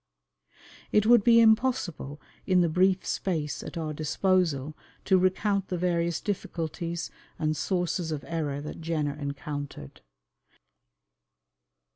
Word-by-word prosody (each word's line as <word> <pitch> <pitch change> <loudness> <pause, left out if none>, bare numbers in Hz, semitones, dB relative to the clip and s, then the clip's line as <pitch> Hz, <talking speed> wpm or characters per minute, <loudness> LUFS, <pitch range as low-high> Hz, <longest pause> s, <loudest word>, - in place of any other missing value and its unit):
It 210 0 +4
would 235 -2 +6
be 230 0 +6
impossible 220 - +2 0.3
in 185 -2 +4
the 170 - +2
brief 185 +3 +2
space 160 -6 -2
at - - -7
our 155 -2 -3
disposal 155 -2 0 0.3
to 190 - +4
recount 195 +2 +1
the 180 - -2
various 170 -1 0
difficulties 170 -3 -4 0.3
and 155 -1 0
sources 175 -1 -1
of 150 -2 -4
error 150 -4 -2
that 150 - -7
Jenner 155 -3 -1
encountered. 145 - -6
170 Hz, 115 wpm, -28 LUFS, 150-190 Hz, 0.3 s, would